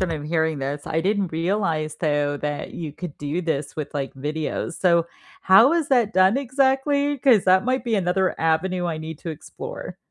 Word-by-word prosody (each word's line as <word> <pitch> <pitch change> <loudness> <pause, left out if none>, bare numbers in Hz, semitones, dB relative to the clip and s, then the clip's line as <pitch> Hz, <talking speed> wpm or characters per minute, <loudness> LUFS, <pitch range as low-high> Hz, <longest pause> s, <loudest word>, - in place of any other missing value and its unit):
when 185 -3 0
I'm 150 -2 -4
hearing 160 -1 0
this. 140 +2 -3
I 160 - 0
didn't 195 -1 0
realize, 165 -3 -1
though, 145 -2 0
that 145 0 -4
you 160 -4 -5
could 175 -2 -8
do 150 +4 -3
this 145 -5 -3
with, 155 -1 -6
like, 140 -2 -3
videos. 150 +4 -3
So 170 -2 +3 0.3
how 210 +9 +6
is 335 -3 0
that 240 -5 +2
done 190 +5 +4
exactly? 275 +2 +1
'Cause 250 -7 +4
that 185 +2 +4
might 255 0 0
be 230 - 0
another 185 -1 0
avenue 175 +3 0
I 165 -2 -2
need 160 -1 -7
to 170 - -5
explore. 155 - -8
170 Hz, 190 wpm, -23 LUFS, 155-210 Hz, 0.3 s, how